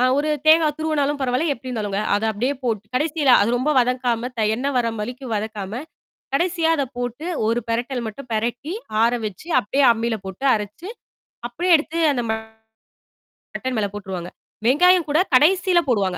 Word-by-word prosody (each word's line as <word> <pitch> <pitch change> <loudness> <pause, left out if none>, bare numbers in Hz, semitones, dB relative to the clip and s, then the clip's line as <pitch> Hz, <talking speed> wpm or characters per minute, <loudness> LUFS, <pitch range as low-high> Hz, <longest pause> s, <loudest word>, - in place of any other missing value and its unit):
அ - - +4
ஒரு 305 +1 0 0.2
தேங்காய் 315 -2 +5
துருவனாலும் 295 -2 0
பரவாயில்ல, 265 +4 +1
எப்படி 255 0 -11
இருந்தாலுங்க, 205 -4 -2
அதை 210 +2 0
அப்படியே 250 +7 -1
போட்டு 220 -4 -1
கடைசியில 295 0 +1
அது 210 - +1
ரொம்ப 290 +5 +1
வதக்காம, 245 -1 -1
த - - +1
எண்ணெய் 275 +4 -2
வர்ற 240 -2 +2
வரைக்கும் 240 +3 -6
வதக்காம, 215 +2 -5 0.5
கடைசியா 340 +2 +1
அதை 280 - 0
போட்டு 245 +6 -4 0.2
ஒரு 230 +1 +1
பிரட்டல் 240 +2 -2
மட்டும் 250 +4 -8
பிரட்டி, 235 +8 -2 0.3
ஆற 235 - +4 0.2
வச்சு 210 - -9
அப்படியே 270 +7 +1
அம்மியில 230 0 -2
போட்டு 190 +7 -7
அரைச்சு, 210 - -5 0.6
அப்படியே 345 +9 +1
எடுத்து 325 +2 -4
அந்த 255 -3 -1 1.1
மட்டன் 255 -2 -6
மேல 205 - +1
போட்டுருவாங்க. 185 -4 -6 0.4
வெங்காயம் 355 +6 +5
கூடக் 315 +5 +1
கடைசியில 360 +5 +4
போடுவாங்க. 195 -6 +1
250 Hz, 155 wpm, -22 LUFS, 225-300 Hz, 1.1 s, தேங்காய்